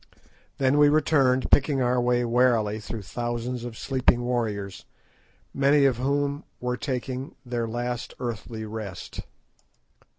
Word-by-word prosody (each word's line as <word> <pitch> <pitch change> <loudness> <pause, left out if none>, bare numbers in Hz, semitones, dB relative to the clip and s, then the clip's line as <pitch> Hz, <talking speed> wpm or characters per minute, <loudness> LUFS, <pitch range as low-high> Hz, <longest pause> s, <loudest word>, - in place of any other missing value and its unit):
Then 135 +2 +3
we 145 0 +7
returned, 140 -4 +3
picking 140 0 +4
our 125 0 +2
way 120 0 +2
warily 115 -3 +2
through 110 0 -6
thousands 120 +3 -3
of 120 -2 -7
sleeping 130 -2 +2
warriors, 110 -6 -2 0.7
many 140 +1 +4
of 130 -4 +3
whom 140 +2 0 0.2
were 125 0 -1
taking 130 +1 -4
their 120 -2 -2
last 120 +1 -4
earthly 115 -2 -5
rest. 105 -4 -7
125 Hz, 125 wpm, -26 LUFS, 115-135 Hz, 0.7 s, we